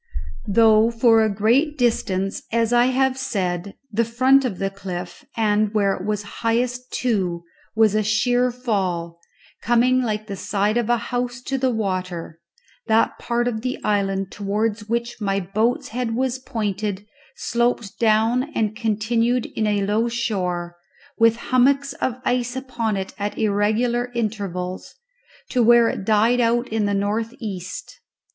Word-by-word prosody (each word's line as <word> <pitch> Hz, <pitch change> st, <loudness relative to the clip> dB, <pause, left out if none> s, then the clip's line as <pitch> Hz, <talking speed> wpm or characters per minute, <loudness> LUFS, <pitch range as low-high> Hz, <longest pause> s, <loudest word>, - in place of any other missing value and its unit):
Though 220 Hz, +1 st, +5 dB
for 230 Hz, -1 st, +4 dB
a 220 Hz, -, +2 dB
great 245 Hz, +10 st, +2 dB
distance, 195 Hz, -6 st, 0 dB
as 230 Hz, 0 st, +1 dB
I 240 Hz, 0 st, +5 dB
have 260 Hz, +1 st, +1 dB
said, 190 Hz, -6 st, -2 dB, 0.2 s
the 230 Hz, +2 st, +2 dB
front 260 Hz, +4 st, +3 dB
of 210 Hz, -8 st, -2 dB
the 195 Hz, +1 st, -2 dB
cliff, 180 Hz, -2 st, -7 dB
and 215 Hz, -1 st, +2 dB
where 200 Hz, -2 st, +3 dB
it 185 Hz, -, -7 dB
was 210 Hz, 0 st, -2 dB, 0.2 s
highest 245 Hz, +2 st, -1 dB
too, 185 Hz, -8 st, -1 dB, 0.3 s
was 220 Hz, -2 st, +4 dB
a 215 Hz, -, +2 dB
sheer 245 Hz, +4 st, +2 dB
fall, 190 Hz, -9 st, -2 dB, 0.4 s
coming 245 Hz, +2 st, +3 dB
like 215 Hz, -3 st, -2 dB
the 200 Hz, -2 st, -5 dB
side 205 Hz, +3 st, 0 dB
of 240 Hz, -1 st, 0 dB
a 240 Hz, -, +4 dB
house 245 Hz, +2 st, -3 dB
to 270 Hz, +1 st, -2 dB
the 260 Hz, 0 st, +2 dB
water, 185 Hz, -7 st, -3 dB, 0.5 s
that 220 Hz, +1 st, +2 dB
part 240 Hz, 0 st, -1 dB
of 220 Hz, -3 st, -2 dB
the 255 Hz, +1 st, -2 dB
island 195 Hz, -2 st, 0 dB
towards 210 Hz, +1 st, -2 dB
which 235 Hz, 0 st, -2 dB
my 195 Hz, -1 st, 0 dB
boat's 215 Hz, +6 st, -1 dB
head 235 Hz, -1 st, -2 dB
was 260 Hz, +1 st, -1 dB
pointed 210 Hz, -4 st, -3 dB, 0.3 s
sloped 235 Hz, -3 st, -1 dB
down 230 Hz, +5 st, +2 dB
and 215 Hz, -1 st, 0 dB
continued 230 Hz, +2 st, 0 dB
in 215 Hz, -, 0 dB
a 205 Hz, -1 st, +1 dB
low 215 Hz, +3 st, +1 dB
shore, 180 Hz, -7 st, -2 dB, 0.4 s
with 230 Hz, 0 st, +5 dB, 0.2 s
hummocks 275 Hz, +2 st, +3 dB
of 250 Hz, -1 st, -2 dB
ice 245 Hz, 0 st, 0 dB
upon 235 Hz, -5 st, -2 dB
it 190 Hz, 0 st, -5 dB
at 205 Hz, +1 st, -3 dB
irregular 220 Hz, +4 st, +1 dB
intervals, 195 Hz, -5 st, -3 dB, 0.5 s
to 250 Hz, -, +1 dB
where 235 Hz, 0 st, +6 dB
it 190 Hz, -, -4 dB
died 220 Hz, +3 st, +3 dB
out 240 Hz, +1 st, +2 dB
in 220 Hz, -1 st, 0 dB
the 205 Hz, -, 0 dB
north 215 Hz, +4 st, -1 dB
east. 185 Hz, -7 st, -7 dB
220 Hz, 150 wpm, -22 LUFS, 200-240 Hz, 0.5 s, where